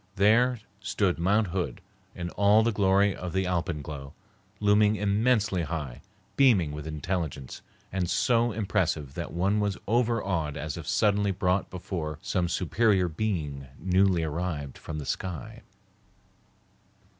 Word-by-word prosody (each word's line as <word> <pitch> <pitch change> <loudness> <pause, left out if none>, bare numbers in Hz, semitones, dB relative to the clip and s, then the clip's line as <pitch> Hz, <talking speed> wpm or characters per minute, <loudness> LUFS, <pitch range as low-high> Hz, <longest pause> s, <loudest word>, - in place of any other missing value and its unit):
There 115 +5 +4 0.2
stood 95 -2 0
Mount 100 +3 +2
Hood 90 0 -3 0.4
in 85 -1 -5
all 105 +2 +4
the 115 - +2
glory 100 -1 +3
of 90 -2 -6
the 95 0 +1
alpenglow, 75 -6 -3 0.4
looming 105 +1 +4
immensely 105 -1 +1
high, 75 -6 -4 0.3
beaming 110 - +4
with 75 +1 -6
intelligence, 75 -3 -4 0.3
and 90 -2 -1
so 120 -1 +2
impressive 95 -9 -1
that 85 +2 -5
one 95 +5 +1
was 100 -2 0
overawed 100 - 0
as 75 0 -4
if 85 -3 -8
suddenly 105 0 +2
brought 95 0 0
before 85 -4 -4
some 90 -2 0
superior 95 +2 +2
being 80 -7 -3
newly 95 0 +2
arrived 75 -3 -3
from 75 - -6
the 75 - -5
sky. 90 -3 -5
95 Hz, 130 wpm, -27 LUFS, 80-105 Hz, 0.4 s, There